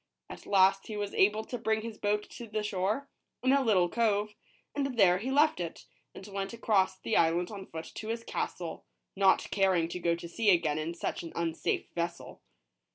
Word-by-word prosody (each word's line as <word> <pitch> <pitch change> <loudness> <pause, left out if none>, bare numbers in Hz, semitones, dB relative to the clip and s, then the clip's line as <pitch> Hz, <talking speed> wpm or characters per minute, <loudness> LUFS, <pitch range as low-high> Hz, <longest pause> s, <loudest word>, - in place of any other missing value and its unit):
At - - -10
last 195 0 +4
he 215 - -5
was 205 -1 -3
able 210 +3 +3
to 245 - -5
bring 220 -1 0
his 225 -1 -7
boat 210 0 0
to 235 - -8
the 215 0 -2
shore, 210 +6 -1 0.4
in 260 - +4
a 280 - +4
little 200 -8 +3
cove; 210 0 +1 0.4
and 275 -3 -2
there 180 -4 +5
he 240 +6 -3
left 295 0 +3
it, 170 -2 -5 0.3
and 190 - -9
went 195 0 -4
across 195 -5 +1
the 220 - -2
island 170 +3 +2
on 195 -2 -8
foot 160 0 -7
to 215 - -7
his 230 +1 -3
castle, - - -4 0.3
not 195 -1 +3
caring 190 -4 +2
to 180 - -5
go 170 -1 +1
to 170 0 -8
sea 215 +5 +1
again 165 -5 +3
in 165 +2 -3
such - - -3
an 165 - -8
unsafe 165 -1 -1
vessel. 170 0 -4
200 Hz, 200 wpm, -30 LUFS, 175-220 Hz, 0.4 s, there